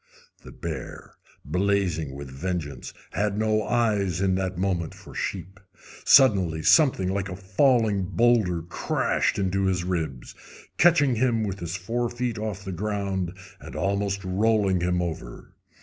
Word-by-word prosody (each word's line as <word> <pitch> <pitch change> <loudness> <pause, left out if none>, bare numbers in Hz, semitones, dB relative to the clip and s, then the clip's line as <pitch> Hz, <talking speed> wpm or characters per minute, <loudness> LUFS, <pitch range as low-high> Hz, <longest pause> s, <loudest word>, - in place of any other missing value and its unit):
The - - -11
bear, - - -7 0.3
blazing 90 -3 0
with 70 -1 -8
vengeance, 80 0 -4 0.2
had 105 +2 -1
no 110 0 +1
eyes 105 -7 0
in 95 -1 +2
that 95 -1 -2
moment 90 -3 -1
for - - -13
sheep. 95 +2 -5 0.4
Suddenly 95 - +5
something 135 - +4
like 95 0 -2
a 90 - -5
falling 100 +1 +2
boulder 100 -4 +2
crashed 85 - -1
into 95 0 0
his 90 -2 0
ribs, 80 -8 -3 0.5
catching 145 -8 +4
him 115 -2 +1
with 100 -2 -4
his 85 0 -4
forefeet 120 +4 -2
off 105 -2 -5
the 95 - -4
ground 95 -2 -3 0.2
and - - -10
almost 100 0 -1
rolling 100 -1 +2
him 90 0 +1
over. 80 -8 -7
95 Hz, 135 wpm, -25 LUFS, 90-110 Hz, 0.5 s, Suddenly